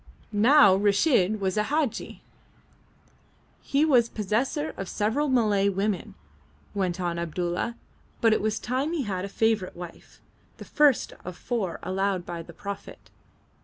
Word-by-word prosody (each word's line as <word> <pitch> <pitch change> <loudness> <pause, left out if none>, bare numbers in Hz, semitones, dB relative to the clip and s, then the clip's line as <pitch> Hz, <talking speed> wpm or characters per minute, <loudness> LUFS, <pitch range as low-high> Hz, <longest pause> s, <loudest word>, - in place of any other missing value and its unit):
Now 230 +1 +6
Reshid 205 - +2
was 190 0 -1
a 210 - +3
Hadji. 295 -3 -2 1.4
He 280 +3 +1
was 245 -6 +4
possessor 245 - -1
of 195 -2 -6
several 230 +8 0
Malay 210 -6 +3
women, 195 -1 -2 0.6
went 185 -3 -1
on 175 -1 -2
Abdulla, 175 +6 -2 0.4
but 225 -1 +4
it - - +1
was 215 0 0
time 265 +6 -2
he 315 -5 -1
had 190 -4 -3
a - - -7
favourite 220 -2 0
wife, 175 -1 -11 0.4
the - - -10
first 295 -4 +3
of - - -20
the - - -20
four 205 -8 -2
allowed 190 0 -1
by 170 -1 -5
the 165 - -12
Prophet. 200 +4 -9
205 Hz, 145 wpm, -26 LUFS, 185-245 Hz, 1.4 s, Now